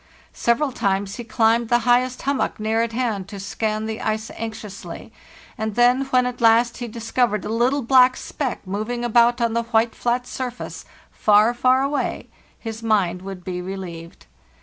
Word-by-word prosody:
Several 265 Hz, +5 st, +1 dB
times 200 Hz, -3 st, -1 dB
he 240 Hz, -, -5 dB
climbed 230 Hz, 0 st, +2 dB
the 240 Hz, -, +5 dB
highest 250 Hz, +1 st, +2 dB
hummock 280 Hz, -4 st, -1 dB
near 220 Hz, +1 st, +1 dB
at 230 Hz, 0 st, -1 dB
hand 225 Hz, -5 st, -2 dB
to 200 Hz, -1 st, -8 dB
scan 215 Hz, +2 st, -2 dB
the 220 Hz, 0 st, -4 dB
ice 220 Hz, 0 st, -2 dB
anxiously; 215 Hz, -3 st, -7 dB, 0.5 s
and 220 Hz, -1 st, -2 dB
then, 245 Hz, +3 st, +4 dB
when 255 Hz, -2 st, +2 dB
at 250 Hz, 0 st, -4 dB
last 230 Hz, +1 st, +4 dB
he 240 Hz, -, -5 dB
discovered 225 Hz, -2 st, -1 dB
a -, -, -4 dB
little 250 Hz, +5 st, +1 dB
black 255 Hz, +1 st, +5 dB
speck 265 Hz, -8 st, -4 dB
moving 215 Hz, +5 st, -3 dB
about 240 Hz, +1 st, +4 dB
on 235 Hz, -1 st, +1 dB
the 235 Hz, -, +1 dB
white 230 Hz, 0 st, +1 dB
flat 245 Hz, +1 st, -1 dB
surface 250 Hz, -1 st, -6 dB, 0.3 s
far, 215 Hz, +2 st, +4 dB
far 255 Hz, +2 st, +3 dB
away, 280 Hz, +1 st, -2 dB, 0.3 s
his 225 Hz, -1 st, -7 dB
mind 195 Hz, -6 st, +1 dB
would 190 Hz, -1 st, -8 dB
be 180 Hz, -1 st, -4 dB
relieved. 180 Hz, -3 st, -8 dB
230 Hz, 170 wpm, -22 LUFS, 215-245 Hz, 0.5 s, the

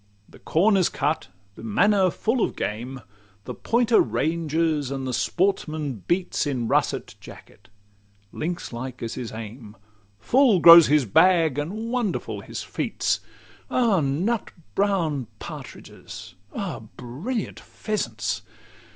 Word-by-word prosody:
The -, -, -17 dB
corn 195 Hz, +6 st, +2 dB
is 185 Hz, -, +3 dB
cut, 150 Hz, +3 st, -1 dB, 0.3 s
the -, -, -13 dB
manor 190 Hz, -, +3 dB
full 225 Hz, +7 st, -1 dB
of -, -, -2 dB
game; 125 Hz, +5 st, -4 dB, 0.4 s
The -, -, -5 dB
pointer 235 Hz, -1 st, +2 dB
ranges, 160 Hz, -2 st, 0 dB
and 135 Hz, -1 st, -4 dB
the 130 Hz, -, -3 dB
sportsman 155 Hz, -, -1 dB
beats 175 Hz, -3 st, 0 dB
In 125 Hz, -5 st, -2 dB
russet -, -, 0 dB
jacket: -, -, -15 dB, 0.6 s
lynx 170 Hz, -3 st, -4 dB
like 125 Hz, +1 st, -6 dB
is 115 Hz, -, -4 dB
his 125 Hz, -3 st, -6 dB
aim; 110 Hz, -1 st, -9 dB, 0.4 s
Full 230 Hz, -, +4 dB
grows 170 Hz, 0 st, +10 dB
his 150 Hz, -2 st, +3 dB
bag, 160 Hz, -, +4 dB
and 215 Hz, +10 st, -4 dB
wonderful 240 Hz, -6 st, -2 dB
his -, -, -6 dB
feats. -, -, -1 dB, 0.5 s
Ah, 230 Hz, -7 st, +2 dB
nut 170 Hz, +11 st, -1 dB, 0.2 s
brown 170 Hz, -, 0 dB
partridges! -, -, -10 dB, 0.2 s
Ah, 180 Hz, -, -4 dB, 0.2 s
brilliant 165 Hz, -, -4 dB
pheasants! 115 Hz, -, -3 dB
160 Hz, 125 wpm, -24 LUFS, 130-195 Hz, 0.6 s, grows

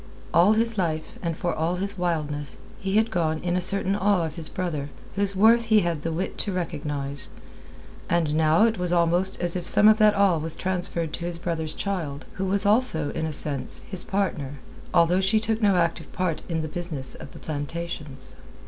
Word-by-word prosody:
All 180 Hz, +5 st, +6 dB
his 225 Hz, -1 st, +1 dB
life, 160 Hz, -3 st, -2 dB
and 165 Hz, -2 st, -2 dB
for 175 Hz, -, -1 dB
all 165 Hz, +3 st, -1 dB
his 200 Hz, +2 st, -3 dB
wildness, 150 Hz, -6 st, -2 dB, 0.2 s
he 195 Hz, 0 st, -2 dB
had 220 Hz, +1 st, +2 dB
gone 160 Hz, -4 st, 0 dB
in 175 Hz, 0 st, -1 dB
a 180 Hz, -, +1 dB
certain 195 Hz, +1 st, +2 dB
awe 200 Hz, -3 st, +2 dB
of 160 Hz, -, -5 dB
his 160 Hz, -1 st, -5 dB
brother, 155 Hz, -6 st, -3 dB, 0.3 s
whose 200 Hz, 0 st, 0 dB
worth 230 Hz, +4 st, +5 dB
he 220 Hz, -1 st, +4 dB
had 170 Hz, -4 st, -1 dB
the 165 Hz, -, -2 dB
wit 175 Hz, +4 st, -3 dB
to 205 Hz, -, +2 dB
recognize; 145 Hz, -6 st, -4 dB, 0.8 s
and 165 Hz, -3 st, +1 dB
now 160 Hz, +4 st, +4 dB
it 225 Hz, -4 st, 0 dB
was 180 Hz, -1 st, 0 dB
almost 175 Hz, +2 st, +2 dB
as 175 Hz, 0 st, +1 dB
if 175 Hz, -1 st, -3 dB
some 210 Hz, -, +5 dB
of 215 Hz, +1 st, +6 dB
that 215 Hz, -1 st, +5 dB
awe 195 Hz, -5 st, +3 dB
was 160 Hz, +1 st, -1 dB
transferred 175 Hz, -3 st, -1 dB
to 170 Hz, -, -4 dB
his 175 Hz, -1 st, -3 dB
brother's 165 Hz, -2 st, -3 dB
child, 160 Hz, -8 st, -3 dB
who 190 Hz, -, -3 dB
was 200 Hz, +2 st, +2 dB
also, 205 Hz, -, +3 dB
in 160 Hz, -, -2 dB
a -, -, -3 dB
sense, 145 Hz, -2 st, -2 dB
his 185 Hz, -3 st, 0 dB
partner, 170 Hz, -8 st, -2 dB, 0.4 s
although 175 Hz, +3 st, +4 dB
she 205 Hz, +3 st, +3 dB
took 220 Hz, +1 st, -1 dB
no 200 Hz, -3 st, +4 dB
active 170 Hz, -3 st, 0 dB
part 180 Hz, -4 st, -1 dB
in 160 Hz, -2 st, -1 dB
the -, -, -3 dB
business 155 Hz, -5 st, -3 dB
of 135 Hz, -, -10 dB
the -, -, -11 dB
plantations. 150 Hz, -3 st, -6 dB
175 Hz, 200 wpm, -25 LUFS, 155-195 Hz, 0.8 s, All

